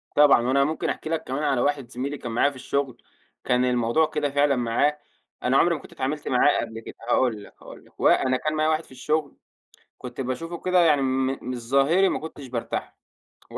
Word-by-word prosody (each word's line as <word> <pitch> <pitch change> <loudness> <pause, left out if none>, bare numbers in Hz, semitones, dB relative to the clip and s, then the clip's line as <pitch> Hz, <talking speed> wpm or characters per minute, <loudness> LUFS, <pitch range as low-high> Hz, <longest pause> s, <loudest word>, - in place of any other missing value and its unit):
طبعًا. 145 -4 +6
وأنا 140 +1 +3
ممكن 155 +2 -2
أحكي 155 - -4
لك 160 -1 -1
كمان 135 +4 -3
على 135 -4 +1
واحد 140 -4 -1
زميلي 135 +4 -4
كان 120 - -6
معايا 130 +5 +3
في 140 - -12
الشُغل، 135 -1 -3 0.4
كان 125 0 +2
الموضوع 125 +5 +2
كده 150 -2 -2
فعلًا 145 0 +2
معاه، 125 +5 +1 0.5
أنا 130 +2 +3
عُمري 170 -1 +4
ما 145 - -8
كنت - - -15
اتعاملت 145 +3 -3
معاه 130 +3 +3
قبل 115 0 -6
كده، - - -10
هاقول 115 -5 +1
لك، - - -15
هاقول - - -12
لك. - - -26
و - - +3
أنا 130 -1 +3
كان 155 +3 -2
معايا 155 0 +2
واحد 155 +1 0
في - - -20
الشُغل، 150 +3 -2 0.6
كنت 125 +1 -8
باشوفه 165 +7 -4
كده 180 -1 +2
يعني 150 -5 +4
م 130 0 +1 0.2
من 125 - -4
الظاهري 140 +10 +2
ما - - -1
كنتش 150 -3 -9
بارتاح 120 -2 -4 0.6
له - - -6
140 Hz, 210 wpm, -24 LUFS, 125-150 Hz, 0.6 s, طبعًا